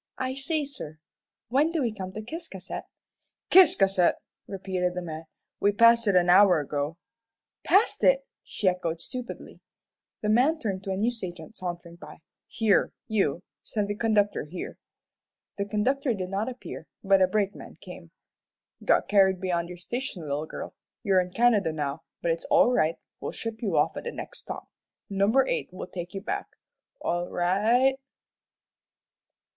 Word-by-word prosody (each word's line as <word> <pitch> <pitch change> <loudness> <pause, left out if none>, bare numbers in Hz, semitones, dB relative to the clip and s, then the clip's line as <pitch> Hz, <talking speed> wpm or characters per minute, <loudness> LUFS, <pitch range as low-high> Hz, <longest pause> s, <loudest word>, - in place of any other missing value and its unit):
"I 260 0 -2
say, 290 +3 -1
sir, 245 - -7 0.5
when 285 +6 +3
do 335 - -1
we 230 -3 -1
come 190 -3 -6
to 215 - -6
Ciscasset?" 235 - -7 0.7
"Ciscasset!" 195 - +6 0.3
repeated 185 -2 -2
the 180 - -2
man. 160 -1 -6 0.3
"We 205 0 +3
passed 230 +1 +6
it 200 - +3
an 180 -1 +4
hour 180 -1 +7
ago." 145 +2 -3 0.7
"Passed 400 +4 +3
it!" - - +4 0.2
she 200 - -3
echoed, 170 -3 0
stupidly. 250 +7 -7 0.6
The 210 - -1
man 260 +9 +4
turned 195 -9 -3
to 195 - -2
a 190 - -1
news 230 +2 -1
agent 175 +3 -7
sauntering 175 -2 -6
by. - - -11 0.3
"Here, 220 -3 +2
you, 190 -6 0 0.2
send 210 -2 -2
the 205 - -1
conductor 210 -5 +1
here." 175 +4 -7 0.8
The 200 - 0
conductor 245 +5 0
did 185 -2 -4
not 205 +5 -1
appear, 250 0 -8 0.2
but 195 -1 +4
a 185 - +6
brakeman 200 +1 -2
came. - - -11 0.7
"Got - - +3
carried 190 -2 +4
beyond 175 -2 -1
your 180 - -8
station, 225 -1 -5
little 150 +1 -3
girl. - - -7 0.3
You're 195 -4 +4
in 180 - -5
Canada 215 -6 +3
now, 150 0 -3 0.2
but 170 - +2
it's 165 - -3
all 245 - +5
right; 155 -6 +2 0.2
we'll - - -5
ship 225 -1 -6
you 210 -5 0
off - - +2
at - - -6
the 475 - -2
next - - -7
stop. - - -7 0.4
Number 200 +7 +3
eight - - -2
will 185 - -6
take 175 0 -7
you 195 - -3
back. - - -3 0.5
All 175 +1 -1
ri 175 - -2
i 180 +2 +2
i 230 +4 +4
ght." - - -8
195 Hz, 165 wpm, -27 LUFS, 180-235 Hz, 0.8 s, hour